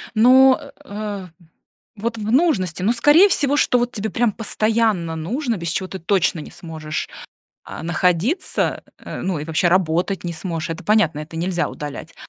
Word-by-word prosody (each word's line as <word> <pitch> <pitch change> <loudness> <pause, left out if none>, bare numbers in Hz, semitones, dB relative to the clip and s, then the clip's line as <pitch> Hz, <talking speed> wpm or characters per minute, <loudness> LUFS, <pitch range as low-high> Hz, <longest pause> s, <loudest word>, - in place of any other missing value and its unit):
Ну, 260 +4 +6 0.3
э, 205 -5 -6 0.7
вот 230 +2 -3
в 215 0 -3
нужности, 225 - +1
ну 210 +5 +3
скорее 295 +11 +6
всего, 290 -6 +1
что 250 - +3
вот 245 +1 -1
тебе 220 0 -3
прямо 235 -2 +1
постоянно 215 -6 0
нужно, 230 - -2
без 170 -2 -4
чего 185 +2 -2
ты 190 - -6
точно 175 -1 +1
не - - -9
сможешь, 155 -2 -6 0.6
а, - - -8
находиться, 180 - 0 0.2
э, - - -7
ну 185 -3 -1
и 145 - -5
вообще 160 +2 +1
работать 180 +1 +1
не 170 - -3
сможешь, 165 -1 -4
это 165 +2 -6
понятно, 205 -8 +2
это 155 +2 -9
нельзя 175 +1 -1
удалять. 150 +2 -8
190 Hz, 165 wpm, -21 LUFS, 165-230 Hz, 0.7 s, Ну